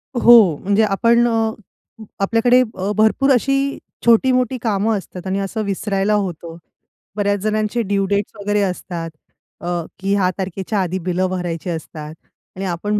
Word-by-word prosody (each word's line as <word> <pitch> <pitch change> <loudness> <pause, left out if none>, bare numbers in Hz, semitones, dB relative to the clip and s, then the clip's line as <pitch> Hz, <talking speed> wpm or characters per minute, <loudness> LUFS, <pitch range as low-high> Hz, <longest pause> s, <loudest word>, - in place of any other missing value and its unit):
हो. 230 -9 +7
म्हणजे 205 +3 +2
आपण 230 +4 +3
अ, 225 -1 +1 0.7
आपल्याकडे 230 +5 +3 0.2
अ, 190 +2 -2
भरपूर 220 +6 +3
अशी 275 +2 +1 0.3
छोटी-मोठी 255 +2 +3
कामं 215 -1 0
असतात 185 -1 -9
आणि 195 +1 -1
असं 200 +3 -3
विसरायला 200 +1 -1
होतं. 175 -5 -3 0.6
बऱ्याच 205 -1 0
जणांचे 215 +2 0
ड्यू 200 -2 0
डेट्स 200 +2 -1
वगैरे 205 +1 0
असतात 180 -3 -3 0.5
अ, - - -8 0.3
की 195 +1 -1
ह्या 190 -2 +2
तारखेच्या 195 +2 -3
आधी 185 0 -2
बिलं 185 +1 0
भरायची 180 -2 -4
असतात. 155 -2 -6 0.4
आणि 190 +1 -4
आपण 200 +4 -1
200 Hz, 145 wpm, -19 LUFS, 185-225 Hz, 0.7 s, हो